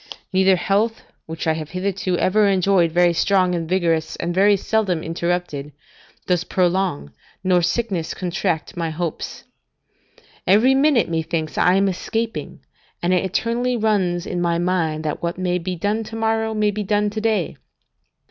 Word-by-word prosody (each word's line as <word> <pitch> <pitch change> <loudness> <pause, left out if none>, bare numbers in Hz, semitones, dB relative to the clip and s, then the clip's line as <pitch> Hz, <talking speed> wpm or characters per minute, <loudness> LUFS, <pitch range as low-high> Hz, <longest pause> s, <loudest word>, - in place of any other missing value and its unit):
Neither 190 0 +4
health, 205 +5 0 0.2
which 160 0 -5
I 160 - +2
have 155 -1 -5
hitherto 185 0 -2
ever 205 +4 +3
enjoyed 190 -3 +3
very 175 +1 +3
strong 185 +1 +2
and 165 -2 -3
vigorous, 165 -4 0
and 175 +1 -3
very 200 +2 +4
seldom 195 -5 0
interrupted, 165 -4 -3 0.5
does 180 -2 +1
prolong, 180 - 0 0.3
nor 180 -1 +3
sickness 180 -1 -1
contract 175 -2 -2
my 165 -2 -2
hopes. 160 0 -5 1.0
Every 220 +8 +5
minute, 270 -3 +3
methinks, 160 -1 -2
I 180 - +4
am 195 +1 +3
escaping, 225 +4 -3 0.4
and 175 +1 +2
it 180 - +2
eternally 235 +6 -1
runs 190 -6 +1
in 175 - -3
my 170 -1 +1
mind, 170 -3 0
that 150 - -3
what 170 0 -2
may 180 -1 0
be 180 +1 -4
done 205 +6 -1
to 225 - -8
morrow, 220 0 0
may 210 -1 +2
be 210 +1 -4
done 205 +1 0
to 215 +1 -4
day. 215 -6 0
185 Hz, 155 wpm, -21 LUFS, 170-205 Hz, 1.0 s, Every